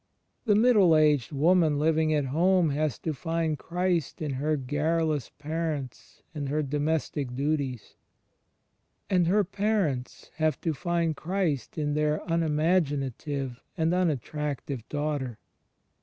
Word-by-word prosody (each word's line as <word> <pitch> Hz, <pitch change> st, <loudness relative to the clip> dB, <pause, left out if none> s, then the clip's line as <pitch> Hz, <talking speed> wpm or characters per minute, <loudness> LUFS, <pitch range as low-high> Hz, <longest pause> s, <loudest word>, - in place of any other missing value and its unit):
The 210 Hz, -3 st, +4 dB
middle 210 Hz, -8 st, +5 dB
aged 150 Hz, -4 st, +3 dB
woman 155 Hz, +1 st, +3 dB
Uving 155 Hz, +1 st, +2 dB
at 145 Hz, -, 0 dB
home 170 Hz, +4 st, +3 dB
has 150 Hz, -1 st, -1 dB
to 160 Hz, -, -3 dB
find 165 Hz, +2 st, -1 dB
Christ 175 Hz, -3 st, -1 dB
in 150 Hz, -3 st, -2 dB
her 150 Hz, +4 st, 0 dB
garrulous 150 Hz, +1 st, 0 dB
parents 150 Hz, -6 st, -4 dB
and 145 Hz, -3 st, -4 dB
her 150 Hz, +2 st, 0 dB
domestic 145 Hz, -2 st, -1 dB
duties: 140 Hz, -4 st, -2 dB, 1.1 s
and 180 Hz, -3 st, +3 dB
her 205 Hz, +4 st, +4 dB
parents 195 Hz, -, -2 dB
have 155 Hz, -3 st, +1 dB
to 165 Hz, -, 0 dB
find 170 Hz, 0 st, -1 dB
Christ 170 Hz, -5 st, -2 dB
in 150 Hz, -1 st, 0 dB
their 150 Hz, 0 st, 0 dB
unimaginative 150 Hz, -5 st, 0 dB, 0.2 s
and 165 Hz, +1 st, +1 dB
unattractive 150 Hz, -6 st, -2 dB
daughter. 145 Hz, -5 st, -2 dB
155 Hz, 120 wpm, -27 LUFS, 145-165 Hz, 1.1 s, middle